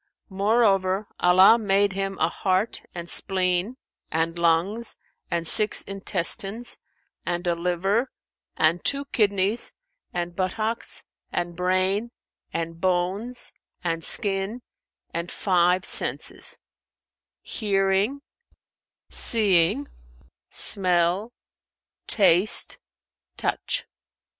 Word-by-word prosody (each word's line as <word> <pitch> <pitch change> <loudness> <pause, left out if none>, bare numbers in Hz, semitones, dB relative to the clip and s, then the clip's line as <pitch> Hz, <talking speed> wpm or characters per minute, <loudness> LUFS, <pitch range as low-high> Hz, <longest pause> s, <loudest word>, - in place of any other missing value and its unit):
Moreover, 195 -1 +1
Allah 185 +6 +6
made 200 -1 +1
him 195 0 -3
a 160 - +2
heart 190 +5 -1
and 170 -1 -6
spleen 185 +6 -1 0.3
and 165 +1 -1
lungs 175 +8 +1 0.3
and 170 -1 -2
six 215 +3 +3
intestines 195 +3 +1 0.4
and 175 +1 -3
a 175 - +1
liver 180 +8 -1 0.5
and 165 +3 +2
two 280 0 +1
kidneys 205 -3 0 0.4
and 175 0 -4
buttocks 215 +5 -1 0.3
and 175 0 -3
brain 185 +5 0 0.4
and 165 0 -5
bones 190 +7 -1 0.3
and 165 -1 -2
skin 200 +6 +2 0.5
and 170 +1 -4
five 180 -1 +1
senses; - - -1 0.9
hearing, 200 +5 0 0.8
seeing, 210 +3 +3 0.6
smell, 180 +3 +2 0.8
taste, 195 -1 +4 0.6
touch. - - -1
190 Hz, 85 wpm, -24 LUFS, 175-210 Hz, 0.9 s, Allah